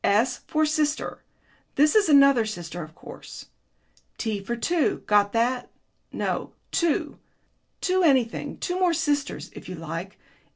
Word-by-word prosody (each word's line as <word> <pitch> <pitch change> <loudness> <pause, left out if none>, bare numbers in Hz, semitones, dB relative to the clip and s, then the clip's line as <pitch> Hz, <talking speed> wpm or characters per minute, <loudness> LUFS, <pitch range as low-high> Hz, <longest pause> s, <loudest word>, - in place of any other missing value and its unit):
"S 230 +5 +2
for 310 0 +2
sister 305 0 -1 0.5
this 300 +2 +4
is 420 -5 +4
another 275 -4 +6
sister, 175 -5 -6
of 155 0 -10
course. - - -11 0.7
T 210 -4 -2
for 235 +5 -2
two. 325 +6 0
Got 205 -1 +3
that? 245 +2 0 0.4
No, - - -3 0.2
two. 335 -4 0 0.6
Two 375 0 +2
anything 265 -8 +2
two 360 0 -2
more 360 -2 +3
sisters, 290 -3 -1
if - - -10
you 185 - -5
like. 165 +4 -6
255 Hz, 135 wpm, -25 LUFS, 205-310 Hz, 0.7 s, another